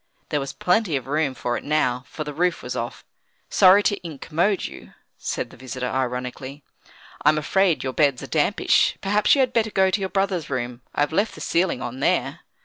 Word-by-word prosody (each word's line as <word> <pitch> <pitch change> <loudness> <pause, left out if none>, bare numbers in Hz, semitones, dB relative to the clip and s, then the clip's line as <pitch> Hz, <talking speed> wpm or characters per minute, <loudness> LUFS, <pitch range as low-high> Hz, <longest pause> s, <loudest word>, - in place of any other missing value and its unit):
There 150 - 0
was 135 -1 -4
plenty 180 -3 +1
of 130 -3 -2
room 145 -1 0
for 120 -1 -2
it - - -8
now, 130 -4 0
for 155 - -6
the 150 -1 -6
roof 175 +3 0
was - - -4
off. - - -5 0.5
"Sorry 195 +1 +6
to 205 -3 0
incommode 165 +5 -1
you," - - -10 0.2
said - - -4
their - - -16
visitor, 130 0 -5
ironically. 130 +2 -4 0.6
"I'm 150 +1 +4
afraid 180 +3 +2
your 130 -1 -3
beds 140 -4 +2
are - - -4
dampish; - - +2
perhaps 205 +5 +3
you 275 - +3
had 250 -1 +1
better 225 -1 +2
go 190 -2 +2
to 205 - +1
your 190 -1 -2
brother's 195 -4 -1
room; 125 -2 -3
I've 145 +2 +1
left 205 +6 +1
the - - -10
ceiling 170 -7 0
on 125 +2 -5
there." - - 0
155 Hz, 200 wpm, -23 LUFS, 130-190 Hz, 0.6 s, Sorry